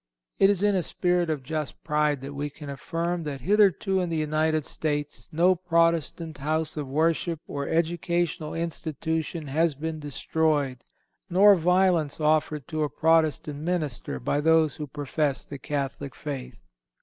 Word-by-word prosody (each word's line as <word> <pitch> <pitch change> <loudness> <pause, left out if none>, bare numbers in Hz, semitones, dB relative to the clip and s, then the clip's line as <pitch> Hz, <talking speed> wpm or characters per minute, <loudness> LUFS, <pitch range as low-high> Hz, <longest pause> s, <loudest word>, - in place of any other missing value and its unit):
It 195 - +6
is 200 -1 +1
in 205 0 +4
a 185 - +2
spirit 175 0 0
of 150 -4 -2
just 155 +1 -4
pride 150 -2 +1
that 140 +1 -7
we 145 +1 -3
can 145 0 -9
affirm 170 +5 -2
that 140 -3 -4
hitherto 195 - +3
in 180 - -2
the 165 - -1
United 155 0 +1
States 150 -2 -3
no 175 +4 +4
Protestant 165 -3 0
house 155 +2 -1
of 150 -3 -4
worship 160 +3 0
or 140 -1 -4
educational 170 -1 0
institution 160 -1 -3
has 155 +2 +1
been 160 +2 -4
destroyed, 145 -2 -1 0.5
nor 200 +3 +7
violence 180 -3 +2
offered 155 -2 +1
to 155 -2 -2
a 150 - +1
Protestant 155 -2 +2
minister 155 - -2
by 145 - 0
those 160 -1 +3
who 150 - -5
profess 145 0 -2
the 140 - -8
Catholic 140 -2 -4
faith. 140 -4 -6
155 Hz, 150 wpm, -26 LUFS, 145-170 Hz, 0.5 s, nor